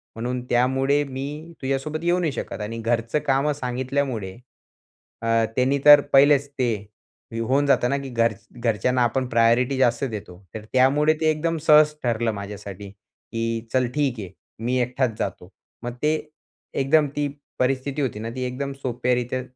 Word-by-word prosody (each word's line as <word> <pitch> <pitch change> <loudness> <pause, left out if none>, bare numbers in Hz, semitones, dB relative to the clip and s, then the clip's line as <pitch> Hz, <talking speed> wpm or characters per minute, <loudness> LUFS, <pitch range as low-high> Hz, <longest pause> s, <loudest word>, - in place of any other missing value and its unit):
म्हणून 125 +2 -3
त्यामुळे 135 +4 +2
मी 145 +4 -6
तुझ्यासोबत 135 +4 -2
येऊ 175 +1 +2
नाही 165 -4 0
शकत." 125 - -5
आणि 110 +2 -4
घरचं 115 +4 0
कामं 140 +2 +2
सांगितल्यामुळे, 130 -5 -2 0.9
अ, 115 0 +2
त्यांनी 130 +2 +2
तर 145 0 +10
पहिलेच 140 +1 +5
ते 130 -4 -1 0.7
होऊन 135 +5 +2
जातं 135 -3 +3
ना, 140 - +1
की 140 -1 -6
घर 115 -2 +1 0.3
घरच्यांना 120 +2 +1
आपण 130 +2 0
प्रायोरिटी 120 +3 +3
जास्त 120 -1 +2
देतो. 100 -5 -7 0.2
तर 110 -1 -7
त्यामुळे 140 +4 +4
ते 160 - +3
एकदम 165 +2 -1
सहज 150 -1 +7
ठरलं 115 -1 0
माझ्यासाठी, 100 -1 -8
की 115 +3 -6
चल 130 -1 +2
ठीक 140 -6 0
आहे 95 -4 -7 0.3
मी 125 +1 +1
एकटाच 125 -2 -1
जातो. 90 -1 -4 0.3
मग 120 0 -4
ते 150 +1 +2 0.6
एकदम 145 +3 +3
ती 145 0 0 0.3
परिस्थिती 135 +2 0
होती 120 -6 -2
ना, 115 +1 -4
ती 130 - -3
एकदम 135 +2 -4
सोप्या 125 0 0
रित्या 125 +1 -2
130 Hz, 155 wpm, -23 LUFS, 115-140 Hz, 0.9 s, तर